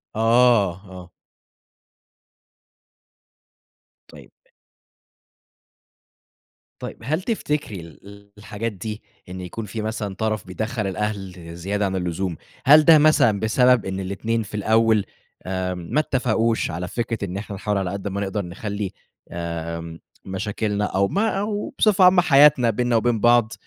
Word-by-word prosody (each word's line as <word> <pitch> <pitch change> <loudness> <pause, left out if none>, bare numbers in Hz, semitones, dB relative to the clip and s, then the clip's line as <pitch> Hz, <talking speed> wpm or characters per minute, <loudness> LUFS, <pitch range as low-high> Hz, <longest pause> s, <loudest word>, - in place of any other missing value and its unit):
آه، 115 -5 +3
آه. 90 -1 -10 3.0
طيب. - - -15 2.5
طيب، - - -7
هل 155 +8 -1
تفتكري 150 - -3
ال 100 +6 -14
الحاجات 110 +2 -5
دي 105 +3 -7 0.3
إن 90 0 -7
يكون 105 +5 -6
في 110 +2 -5
مثلًا 105 -3 -4
طرف 110 -2 -2
بيدخَّل 110 +2 -3
الأهل 95 -4 -5
زيادة 100 +4 -2
عن 95 0 -2
اللزوم، 90 0 -2 0.3
هل 150 +3 +7
ده 160 -2 +8
مثلًا 145 -9 +4
بسبب 125 +2 +3
إن 95 0 -3
الاتنين 110 +4 -2
في 105 +1 -9
الأول 110 0 +2 0.4
آآ 95 -1 -2
ما 90 - -2
اتّفقوش 115 - 0
على 90 +2 -4
فكرة 115 -2 -3
إن 95 +1 -5
إحنا 100 0 -6
نحاول 105 0 -2
على 95 -2 -2
قد 100 0 -5
ما 100 +1 -3
نقدر 100 -1 -3
نخلّي 100 +2 -5 0.4
آآ 85 -1 -5 0.3
مشاكلنا 105 +2 -2
أو 100 0 +1
ما 210 +3 0
أو 210 +6 -3
بصفة 205 -3 +4
عامة 180 0 +7
حياتنا 140 -6 +5
بيننا 120 +2 0
وبين 115 0 +1
بعض، 120 -1 +4
105 Hz, 130 wpm, -22 LUFS, 95-120 Hz, 3.0 s, ده